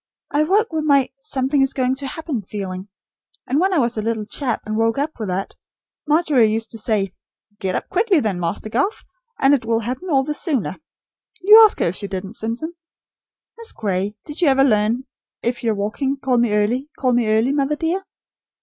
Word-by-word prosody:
I 295 Hz, -, +2 dB
woke 405 Hz, +3 st, +2 dB
with 315 Hz, -1 st, 0 dB
my 280 Hz, -3 st, +3 dB
something 270 Hz, +1 st, 0 dB
is 270 Hz, 0 st, +2 dB
going 255 Hz, -1 st, +1 dB
to 280 Hz, 0 st, -4 dB
happen 305 Hz, -6 st, -4 dB
feeling; 190 Hz, -1 st, -6 dB, 0.6 s
and 280 Hz, -, +1 dB
when 380 Hz, +3 st, +2 dB
I 365 Hz, -, +2 dB
was 240 Hz, -4 st, +1 dB
a -, -, 0 dB
little 220 Hz, -1 st, -2 dB
chap 240 Hz, +2 st, -3 dB
and 215 Hz, 0 st, -3 dB
woke 225 Hz, +2 st, +1 dB
with 280 Hz, -7 st, -2 dB
that, 185 Hz, +2 st, -3 dB, 0.5 s
Margery 295 Hz, -8 st, +3 dB
used 225 Hz, +1 st, -2 dB
to 225 Hz, -, -6 dB
say: 205 Hz, -3 st, 0 dB, 0.5 s
'Get 190 Hz, -1 st, -2 dB
up -, -, -3 dB
quickly 400 Hz, -2 st, +2 dB
then, 210 Hz, -8 st, -1 dB
Master 175 Hz, +5 st, -2 dB
Garth, 275 Hz, -, -1 dB, 0.4 s
and 270 Hz, +1 st, +5 dB
it 275 Hz, -, +2 dB
will 225 Hz, 0 st, 0 dB
happen 255 Hz, -, -4 dB
all 270 Hz, -4 st, +3 dB
the 300 Hz, +2 st, -2 dB
sooner.' 295 Hz, -, -1 dB, 0.6 s
You 425 Hz, +4 st, +9 dB
ask 430 Hz, -, +5 dB
her -, -, +3 dB
if 175 Hz, -, -5 dB
she 200 Hz, -, -4 dB
didn't, 190 Hz, +1 st, -5 dB
Simpson. 235 Hz, +9 st, -3 dB, 0.9 s
Miss 460 Hz, -, -3 dB
Gray, 200 Hz, 0 st, -2 dB
did 295 Hz, +3 st, -7 dB
you 340 Hz, -, +4 dB
ever 270 Hz, -1 st, +5 dB
learn: 225 Hz, 0 st, +2 dB, 0.4 s
'If 240 Hz, +1 st, -2 dB
you're 225 Hz, -2 st, +1 dB
waking 230 Hz, +7 st, -2 dB
call 260 Hz, -2 st, +1 dB
me 235 Hz, -2 st, +2 dB
early, 240 Hz, +7 st, 0 dB
call 255 Hz, -2 st, +1 dB
me 240 Hz, -2 st, +2 dB
early, 220 Hz, +4 st, +3 dB
mother 285 Hz, +1 st, +1 dB
dear'? 330 Hz, +5 st, -1 dB
250 Hz, 200 wpm, -21 LUFS, 215-295 Hz, 0.9 s, You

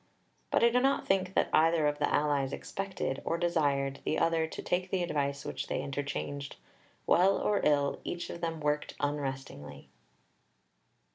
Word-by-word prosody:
But -, -, +2 dB
I 235 Hz, -, +7 dB
do 250 Hz, -, +4 dB
not 270 Hz, +1 st, +2 dB
think 190 Hz, -1 st, +1 dB
that -, -, +2 dB
either 160 Hz, 0 st, +4 dB
of 145 Hz, 0 st, 0 dB
the 145 Hz, -, +1 dB
allies 145 Hz, -2 st, +1 dB
expected, 190 Hz, -8 st, -4 dB
or 165 Hz, -, -1 dB
desired, 140 Hz, -5 st, +1 dB
the 155 Hz, -, 0 dB
other 165 Hz, -1 st, +2 dB
to -, -, -7 dB
take 180 Hz, +1 st, -1 dB
the 185 Hz, -1 st, 0 dB
advice 140 Hz, -4 st, -2 dB
which -, -, -4 dB
they -, -, -2 dB
interchanged. 140 Hz, 0 st, -4 dB, 0.5 s
Well 190 Hz, +3 st, +4 dB
or 210 Hz, -, +1 dB
ill, 145 Hz, -1 st, +2 dB
each 175 Hz, -, -4 dB
of 170 Hz, -, -8 dB
them 165 Hz, -2 st, -3 dB
worked 150 Hz, 0 st, -1 dB
unrestingly. 135 Hz, -, -4 dB
150 Hz, 160 wpm, -31 LUFS, 140-175 Hz, 0.5 s, I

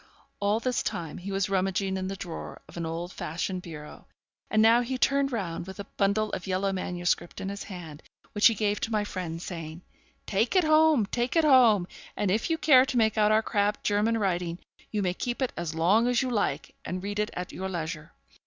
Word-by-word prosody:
All 205 Hz, +2 st, +1 dB
this 250 Hz, 0 st, 0 dB
time 165 Hz, -3 st, -4 dB
he 195 Hz, +3 st, -6 dB
was 195 Hz, 0 st, 0 dB
rummaging 190 Hz, 0 st, 0 dB
in 190 Hz, 0 st, -3 dB
the 195 Hz, -, -4 dB
drawer 175 Hz, -4 st, -7 dB
of -, -, -14 dB
an 170 Hz, -1 st, -3 dB
old 170 Hz, +3 st, -5 dB
fashioned 180 Hz, +3 st, -3 dB
bureau, 150 Hz, -4 st, -10 dB, 0.4 s
and 215 Hz, -, +2 dB
now 225 Hz, +2 st, +6 dB
he 255 Hz, +2 st, -3 dB
turned 275 Hz, +2 st, +2 dB
round, 180 Hz, -7 st, -3 dB
with 190 Hz, +1 st, -9 dB
a -, -, -3 dB
bundle 205 Hz, +2 st, 0 dB
of 185 Hz, -, -5 dB
yellow 190 Hz, +1 st, 0 dB
MSS. 175 Hz, -1 st, 0 dB, 0.2 s
in 190 Hz, -, -4 dB
his 200 Hz, 0 st, -6 dB
hand, 170 Hz, -6 st, -9 dB, 0.3 s
which 205 Hz, -, +5 dB
he 230 Hz, -, +2 dB
gave 205 Hz, 0 st, 0 dB
to 230 Hz, -, -3 dB
my 215 Hz, -1 st, +1 dB
friend, 180 Hz, -5 st, -5 dB
saying, 165 Hz, -1 st, -7 dB, 0.4 s
'Take 215 Hz, -, 0 dB
it 370 Hz, -, +5 dB
home, 310 Hz, -6 st, +5 dB
take 240 Hz, -, -2 dB
it 325 Hz, -, +4 dB
home, 235 Hz, -10 st, +6 dB, 0.3 s
and 200 Hz, -3 st, +1 dB
if 215 Hz, -, 0 dB
you 325 Hz, -, +1 dB
care 270 Hz, -5 st, +6 dB
to 250 Hz, -, -1 dB
make 220 Hz, -2 st, +3 dB
out 210 Hz, -1 st, +3 dB
our 220 Hz, +1 st, +4 dB
crabbed 205 Hz, -1 st, 0 dB
German 210 Hz, +2 st, +2 dB
writing, 175 Hz, -4 st, -1 dB, 0.3 s
you 210 Hz, -2 st, -1 dB
may 180 Hz, -1 st, 0 dB
keep 240 Hz, +6 st, -3 dB
it 260 Hz, -2 st, -1 dB
as 165 Hz, -2 st, -4 dB
long 195 Hz, +9 st, +3 dB
as 245 Hz, +1 st, +2 dB
you 255 Hz, -, -2 dB
like, 200 Hz, -, -1 dB
and 185 Hz, +1 st, -4 dB
read 205 Hz, +1 st, -3 dB
it 210 Hz, -, 0 dB
at 180 Hz, 0 st, -5 dB
your 190 Hz, +1 st, -4 dB
leisure. 160 Hz, -3 st, -5 dB
200 Hz, 220 wpm, -27 LUFS, 180-225 Hz, 0.4 s, now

